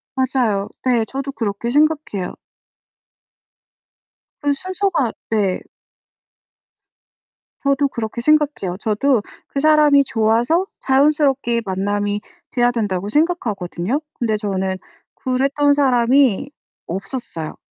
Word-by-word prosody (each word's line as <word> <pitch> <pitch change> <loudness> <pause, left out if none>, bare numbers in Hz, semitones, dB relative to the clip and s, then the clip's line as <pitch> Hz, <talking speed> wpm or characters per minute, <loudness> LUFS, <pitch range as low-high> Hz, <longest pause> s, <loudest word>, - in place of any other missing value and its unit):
맞아요. 240 -6 0 0.2
네, 240 -3 +2
저도 275 +2 -4
그렇게 225 -2 -3
생각해요. 295 - +1 2.1
그 285 -1 +2
순서가 370 - -1 0.2
네. 205 -4 +1 2.0
저도 280 0 +2
그렇게 235 -1 -4
생각해요. 295 -10 +1
저도 230 +3 +1 0.3
그 275 - -3
사람이 300 -1 +5
좋아서 235 - +2 0.2
자연스럽게 270 -3 +2
만남이 205 +2 -1 0.3
돼야 245 -1 +3
된다고 205 -5 -2
생각하거든요. 235 - -1 0.2
근데 220 -3 +1
저는 190 -2 -2 0.4
그랬던 275 +3 +1
사람이 265 -2 +3 0.4
없었어요. 190 - -5
245 Hz, 235 characters per minute, -20 LUFS, 205-285 Hz, 2.1 s, 사람이